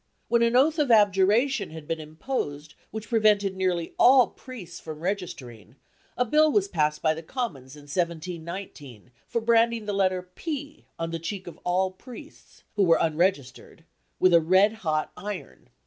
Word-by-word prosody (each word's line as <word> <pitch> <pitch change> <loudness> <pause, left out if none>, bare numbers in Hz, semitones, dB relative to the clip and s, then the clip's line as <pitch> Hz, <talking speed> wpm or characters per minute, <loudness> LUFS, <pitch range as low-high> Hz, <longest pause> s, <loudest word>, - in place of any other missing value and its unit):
" - - -45
When 235 0 +3
an 235 +1 +2
oath 305 +5 +4
of 290 -3 +1
abjuration 210 +2 +3
had 160 -1 -10
been 165 - -2
imposed 155 - -5 0.2
which 220 +1 -7
prevented 210 -4 +3
nearly 180 -3 -1
all 255 0 +6
priests 220 -10 -10
from 155 -1 -8
registering, 135 - -5 0.4
a 250 - +2
Bill 305 +5 +4
was 400 +2 +2
passed 150 - -1
by 155 -1 +3
the 160 - -7
Commons 160 - -5
in 145 - -13
1719 165 - -5 0.2
for 235 - -2
branding 230 -1 +2
the 205 - -2
letter 185 -2 +1
P 300 - -6
on 165 0 -3
the 165 - -3
cheek 190 +4 -5
of 175 - -10
all 185 +1 +1
priests, 250 +9 -14
who 205 - +3
were 165 -3 +5
unregistered, 160 -3 -1 0.4
with 185 -1 +4
a 170 - +7
red 190 +6 +4
hot 155 -4 -1
iron. 200 0 -8
185 Hz, 165 wpm, -26 LUFS, 160-230 Hz, 0.4 s, a